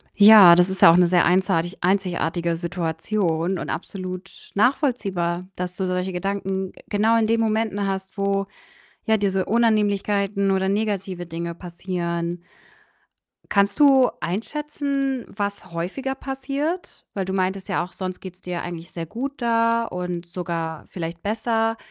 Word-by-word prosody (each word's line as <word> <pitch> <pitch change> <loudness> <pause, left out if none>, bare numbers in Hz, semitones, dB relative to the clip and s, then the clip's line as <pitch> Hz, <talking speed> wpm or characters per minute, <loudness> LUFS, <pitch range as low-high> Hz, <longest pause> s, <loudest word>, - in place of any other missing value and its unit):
Ja, 205 -4 +9
das 180 +1 +4
ist 190 0 -4
ja - - +10
auch 170 - +4
'ne 180 -1 +5
sehr 175 0 +4
einsartig 175 -1 +1
einzigartige 175 -3 0
Situation 170 +1 -1
und - - -5
absolut 185 0 -7
nachvollziehbar, 195 - 0
dass 180 0 -4
du 190 - -2
solche 180 +1 -1
Gedanken, 190 0 -2
äh, - - -15
genau 220 +2 +3
in 225 -1 +2
den 230 +1 +2
Momenten 220 -2 0
hast, 190 0 -4
wo, 195 0 0 0.6
ja, 220 -2 +3
diese 195 -2 0
Unannehmlichkeiten 205 -3 +1
oder 190 0 +1
negative 195 -4 -2
Dinge 170 0 -5
passieren. 170 -1 -4 1.1
Kannst 200 +3 +2
du 270 -3 +6
einschätzen, 275 - -2
was 200 -3 -5
häufiger 190 +11 -3
passiert? 275 +6 -4
Weil 195 -2 -1
du 190 - -3
meintest 190 0 -1
ja 195 -3 0
auch, 180 - -10
sonst 185 -1 -5
geht's 185 0 -10
dir 180 -1 -4
eigentlich 170 -1 -7
sehr 165 -1 -5
gut 265 - -5
da 230 0 +2
und 180 -3 -4
sogar 165 -3 -4
vielleicht 165 -1 -6
besser. 225 +1 0
190 Hz, 145 wpm, -23 LUFS, 175-220 Hz, 1.1 s, ja